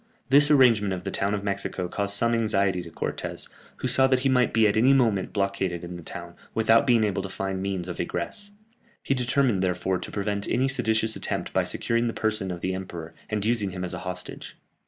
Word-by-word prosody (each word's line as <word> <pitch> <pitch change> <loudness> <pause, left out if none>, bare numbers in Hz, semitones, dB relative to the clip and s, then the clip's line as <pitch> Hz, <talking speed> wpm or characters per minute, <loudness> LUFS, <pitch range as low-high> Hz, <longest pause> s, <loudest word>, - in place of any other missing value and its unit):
This 145 +2 +7
arrangement 115 -9 +4
of 90 - -8
the - - -4
town 100 +1 -1
of 100 - -5
Mexico 100 -2 -2
caused 100 +2 +1
some 115 +3 +2
anxiety 100 -5 +1
to 85 - -10
Cortès, - - -4 0.3
who - - -3
saw 135 0 +5
that 130 -1 +2
he 135 - +1
might 125 -2 +3
be 110 -1 +4
at 100 - +1
any 125 +5 +5
moment 115 -8 +2
blockaded 100 -3 -2
in 90 0 -7
the 85 - -8
town, 85 +1 -9 0.2
without 115 +4 +4
being 120 -3 +4
able 100 -2 0
to 95 - -6
find 95 0 -4
means 95 -2 -3
of 90 - -6
egress. 90 - -4 0.5
He - - +1
determined, 125 -4 +1
therefore, 90 0 0
to - - -7
prevent 100 0 -2
any 130 +2 +1
seditious 110 -4 +1
attempt - - -4
by - - +2
securing 115 +1 0
the 115 - -2
person 110 -3 -1
of 90 -1 -5
the 95 - -1
emperor, 90 -4 -7 0.2
and 105 -1 -2
using 110 -3 +1
him 90 0 -6
as 90 - -1
a - - -4
hostage. 90 0 -5
100 Hz, 220 wpm, -25 LUFS, 95-115 Hz, 0.5 s, This